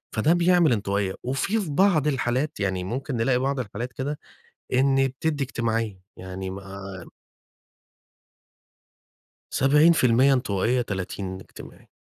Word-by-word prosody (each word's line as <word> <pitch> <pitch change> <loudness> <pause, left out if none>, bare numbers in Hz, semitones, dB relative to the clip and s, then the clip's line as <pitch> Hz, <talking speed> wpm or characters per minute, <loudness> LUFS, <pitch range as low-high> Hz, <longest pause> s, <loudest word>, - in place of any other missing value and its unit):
فدّه 115 +9 +3
بيعمل 175 -3 +4
انطوائية، 100 -2 -1
وفي 135 - 0
في 185 - -5
بعض 160 -3 +3
الحالات 135 +2 -1
يعني 95 -2 -1
ممكن 130 +7 -4
نلاقي 125 +3 +2
بعض 135 +1 -1
الحالات 120 +1 -5
كده، 145 +3 -4 0.6
إن 135 +1 +3
بتدّي 145 +2 -2
اجتماعية، 115 -5 -2 0.2
يعني 95 +1 -6
ما 95 -1 -8 2.4
70% 135 -3 +4
انطوائية، 125 -1 +1
30 95 -2 -4
اجتماعي، - - -13
125 Hz, 110 wpm, -25 LUFS, 100-140 Hz, 2.4 s, بيعمل